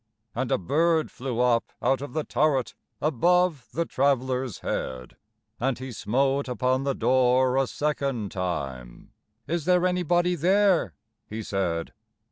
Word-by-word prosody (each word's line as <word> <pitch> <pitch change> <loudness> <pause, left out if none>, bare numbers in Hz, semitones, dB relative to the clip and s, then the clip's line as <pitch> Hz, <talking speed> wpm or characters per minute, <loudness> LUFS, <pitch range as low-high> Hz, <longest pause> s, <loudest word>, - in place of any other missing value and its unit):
And 125 +1 -2
a - - +3
bird 160 - +1
flew 125 -2 -3
up 120 -2 +1
out 135 0 +1
of 145 -3 -7
the 155 0 -1
turret, 140 -7 +1 0.3
Above 160 0 +2
the 170 +1 -1
traveler's 130 - 0
head: 65 -1 -4 0.4
And 130 0 0
he 130 0 -7
smote 135 +5 0
upon 130 +1 0
the 140 -1 0
door 130 0 +3
a 135 -1 +2
second 140 -9 -2
time; 70 -10 -5 0.3
"Is 165 +2 -2
there 180 0 +3
anybody 180 0 +2
there?" 180 - +2 0.3
he 110 +1 -5
said. 90 -5 -2
130 Hz, 135 wpm, -26 LUFS, 120-155 Hz, 0.4 s, a